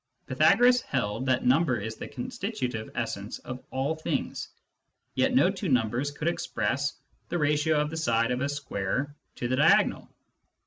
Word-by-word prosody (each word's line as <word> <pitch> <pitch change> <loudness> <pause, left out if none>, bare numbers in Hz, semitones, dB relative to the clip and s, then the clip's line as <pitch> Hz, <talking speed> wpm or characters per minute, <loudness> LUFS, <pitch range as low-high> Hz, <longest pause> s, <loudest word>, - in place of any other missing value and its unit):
Pytha 155 +8 +4
goras 245 +1 +5
held 125 - -2
that 130 -1 +1
number 130 0 +3
is 110 +2 -5
the - - -7
constitutive 200 - -4
essence - - -3
of 125 0 -8
all 135 +4 -1
things, 160 - -3 0.7
yet 265 -1 +2
no 195 -7 +5
two 190 -2 -4
numbers 125 +2 +1
could 150 +2 -4
express 130 -3 -1 0.3
the 175 - -1
ratio 150 0 +2
of 150 0 -1
the 160 - -4
side 115 -6 +1
of 125 0 -1
a 140 - 0
square 140 0 -3 0.2
to 120 - -3
the 130 +1 0
diagonal. - - +4
140 Hz, 165 wpm, -28 LUFS, 125-160 Hz, 0.7 s, goras